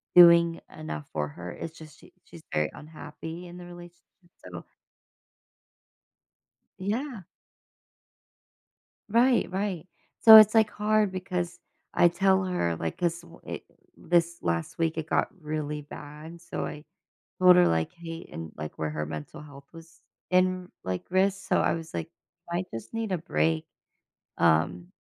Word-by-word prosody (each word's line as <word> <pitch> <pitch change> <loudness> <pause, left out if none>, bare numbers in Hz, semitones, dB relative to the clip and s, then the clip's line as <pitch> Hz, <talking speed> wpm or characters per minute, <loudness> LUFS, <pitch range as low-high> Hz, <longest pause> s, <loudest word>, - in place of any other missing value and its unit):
doing 170 -1 +8 0.2
enough 75 - -6
for 75 -1 -1
her. 90 +4 -8
It's 165 0 -8
just 155 -2 -13
she - - -18
she's - - -13
very 75 0 +1
unhappy 160 +3 -9
in 175 - -11
the 180 - -10
relationship, 175 0 -12 0.5
so 85 -1 -8 2.1
Yeah. 215 - -3 1.8
Right, 240 +3 +3
right. 190 -3 -3 0.3
So 220 -1 +11
it's, 215 0 +9
like, 220 -1 +4
hard 210 -1 +1
because 180 -2 -3 0.3
I 175 - +5
tell 190 +2 +2
her, 175 - -1
like 80 0 -4
'cause 170 -1 -1
wha 170 0 -15
it - - -7 0.3
this 170 0 +1
last 85 -1 -2
week, 165 -1 0
it 155 - -3
got - - +1
really 150 -1 -4
bad, 150 +3 -10
so 170 - -5
I 150 +1 -8 0.6
told 180 -1 +8
her, 180 0 +6
like, 80 -1 0
"Hey," 165 0 -8
and, 80 -1 -7
like, 75 0 -7
where 80 - -2
her 75 0 -3
mental 75 - -7
health 140 -2 -13
was 165 0 -15 0.3
in, 185 0 +2
like, 95 0 -3
risk, 190 +1 +1
so - - +3
I - - +2
was 165 -1 -7
like, 160 - -3
"You 170 0 -9
might 185 - -3
just 115 - -8
need 225 -3 -3
a 185 - +1
break." 80 - 0 0.7
Um, 85 +3 +2
170 Hz, 150 wpm, -27 LUFS, 145-185 Hz, 2.1 s, So